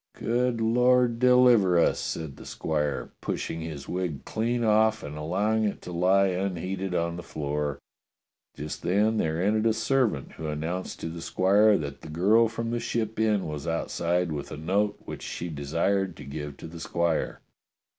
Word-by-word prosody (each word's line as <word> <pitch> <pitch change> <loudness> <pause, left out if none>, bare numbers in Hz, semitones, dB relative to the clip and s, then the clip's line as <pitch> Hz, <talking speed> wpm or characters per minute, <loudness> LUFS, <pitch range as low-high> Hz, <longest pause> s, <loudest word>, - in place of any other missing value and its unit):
'* - - -60
"Good 120 0 0
Lord 125 +1 +3
deliver 125 -7 +5
us!" 85 - +3
said 80 -4 -4
the - - -11
squire, 75 -3 -2
pushing 80 - -3
his 75 -4 -6
wig 90 -6 -3
clean 120 +2 -1
off 110 0 +3
and 75 +1 -6
allowing 100 +8 0
it 105 - -1
to 90 - -7
lie 95 +3 +3
unheeded 95 0 -2
on 85 0 -1
the - - -5
floor. 75 -2 -3 0.8
Just 75 +1 -6
then 105 +5 +2
there 80 -4 0
entered 110 +4 +2
a 110 - +3
servant 110 - 0
who 80 - -6
announced 80 +5 -4
to 80 - -3
the 85 0 -7
squire 100 +5 +4
that 70 -2 -6
the 80 - -10
girl 100 +9 +4
from 115 +1 -4
the 120 - -1
Ship 115 -2 -2
Inn 105 -3 +2
was 75 +1 -5
outside 85 +1 0
with 75 -2 -5
a - - -5
note 100 +6 0
which - - -7
she 85 - -5
desired 85 +5 -1
to - - -9
give 75 0 -6
to - - -10
the 85 +1 -10
squire. 85 0 -1
90 Hz, 175 wpm, -27 LUFS, 80-110 Hz, 0.8 s, deliver